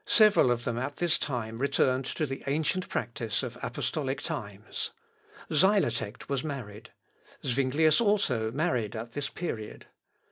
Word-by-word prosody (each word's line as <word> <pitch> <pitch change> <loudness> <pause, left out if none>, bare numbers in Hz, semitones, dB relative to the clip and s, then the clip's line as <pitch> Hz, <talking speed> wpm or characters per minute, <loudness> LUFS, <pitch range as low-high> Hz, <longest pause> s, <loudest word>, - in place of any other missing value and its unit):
Several 210 - +6
of 120 -1 +1
them 120 -1 -1
at 135 +3 -3
this 175 -2 +2
time 115 -4 -3
returned 130 -1 +2
to 155 - -1
the 135 -1 -5
ancient 160 +6 0
practice - - -2
of - - -4
apostolic - - -2
times. - - -4 0.6
Xylotect 150 - +2
was 140 -2 -1
married. 120 -8 -6 0.6
Zuinglius 140 - +3
also 155 - +2
married 125 - 0
at 115 +1 -5
this 145 +3 -3
period. 110 -12 -5
135 Hz, 135 wpm, -29 LUFS, 120-155 Hz, 0.6 s, Several